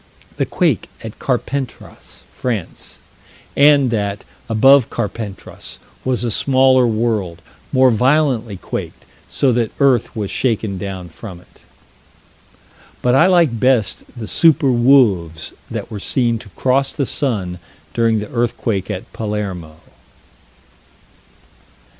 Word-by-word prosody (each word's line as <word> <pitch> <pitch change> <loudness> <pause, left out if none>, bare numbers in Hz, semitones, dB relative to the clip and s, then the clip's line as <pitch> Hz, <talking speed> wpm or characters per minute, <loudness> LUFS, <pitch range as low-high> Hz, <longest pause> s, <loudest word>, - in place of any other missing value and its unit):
The - - 0
quake - - 0
at 110 -1 -8
Carpentras, 130 0 -4
France: 115 -9 -4 0.6
and 140 -3 +5
that, 100 -2 -2 0.3
above 135 +3 +5
Carpentras, 105 -2 -6 0.3
was 130 -1 -1
a 120 - -1
smaller 130 +1 +4
world, 110 -7 -1 0.3
more 130 -1 +5
violently 125 -3 +1
quaked, - - -6 0.2
so 135 - +1
that 115 -2 +1
earth 130 -5 +2
was 105 -3 -3
shaken 110 -6 -1
down 95 -2 -6
from 90 +2 -10
it. 90 - -23 1.4
But 125 - +3
I 160 +7 +5
like 170 -11 +3
best 125 -5 +1
the 115 - -5
super 145 +2 +3
wolves 110 - +3 0.2
that - - -5
were 105 - -5
seen 120 +2 0
to 100 - -13
cross 135 +4 +1
the 140 - -1
sun 100 - -2 0.3
during 115 -1 +2
the 105 0 -4
earthquake 115 -4 -1
at 90 - -6
Palermo. 100 -7 -4
115 Hz, 115 wpm, -18 LUFS, 100-130 Hz, 1.4 s, and